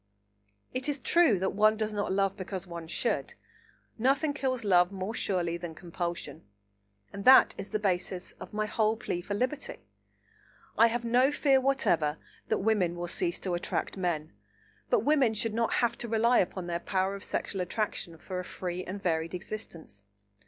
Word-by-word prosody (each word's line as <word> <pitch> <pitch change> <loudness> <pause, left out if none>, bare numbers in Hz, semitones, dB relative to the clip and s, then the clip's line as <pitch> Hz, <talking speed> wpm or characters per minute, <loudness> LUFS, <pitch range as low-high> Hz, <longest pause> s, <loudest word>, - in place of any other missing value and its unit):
It 255 +3 -1
is 290 - 0
true 305 - +4
that 190 +1 -1
one 215 +1 +4
does 215 0 -2
not 205 -2 -1
love 195 0 +1
because 190 -1 -5
one 170 -2 -7
should. 160 - -1 0.6
Nothing 275 +5 +2
kills 260 -4 -1
love 180 -2 +4
more 195 +2 -4
surely 175 -6 -1
than 170 -2 -7
compulsion, 170 - -5 0.7
and 200 0 -6
that 265 +1 +8
is 195 - -7
the 215 - 0
basis 185 -2 -2
of - - -9
my 215 0 -1
whole 220 +1 +1
plea 175 -5 -3
for 205 +3 -4
liberty. 260 +6 -3 0.9
I 230 - +6
have 235 +1 -2
no 250 +4 +4
fear 275 -2 +3
whatever 170 - +2 0.3
that - - +1
women 190 -5 +1
will 175 0 -4
cease 170 0 0
to 185 - -2
attract 175 - -2
men, 170 -4 -2 0.6
but 485 -4 +3
women 275 -7 +3
should 215 +1 -1
not 230 +1 0
have 235 -1 +2
to 240 - -4
rely 230 +2 +3
upon 185 0 -1
their 170 -1 -2
power 190 +1 0
of 200 - -7
sexual 195 - -3
attraction 180 -3 -2
for 185 +2 -5
a - - -4
free 180 0 -5
and 195 +2 -7
varied 165 0 0
existence. 165 - -8
195 Hz, 175 wpm, -29 LUFS, 175-230 Hz, 0.9 s, that